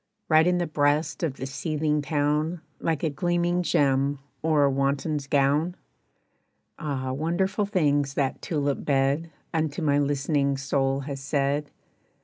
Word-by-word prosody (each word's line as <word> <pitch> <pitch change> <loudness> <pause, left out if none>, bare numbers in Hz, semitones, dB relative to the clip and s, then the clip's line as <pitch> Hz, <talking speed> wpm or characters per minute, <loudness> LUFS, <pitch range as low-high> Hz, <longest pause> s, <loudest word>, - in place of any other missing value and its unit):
Right 160 +1 +5
in 180 0 +3
the 175 - 0
breast 150 0 +1
of 155 -6 -1
the 130 - -5
seething 150 +2 -1
town 150 +3 0 0.2
Like 160 -3 -1
a 160 - +2
gleaming 175 +3 0
gem 140 -3 +2 0.2
or 155 -2 +3
a 140 - +4
wanton's 140 +2 -1
gown? 145 +5 +2 1.0
Ah, 135 -5 -3
wonderful 190 +8 0
things 145 -8 +1
that 135 -2 -1
tulip 145 -4 -1
bed 140 +3 +1 0.2
Unto 160 0 -1
my 145 -1 +3
listening 140 0 +1
soul 135 0 0
has 140 0 -5
said. 140 +1 -1
145 Hz, 135 wpm, -26 LUFS, 140-160 Hz, 1.0 s, Right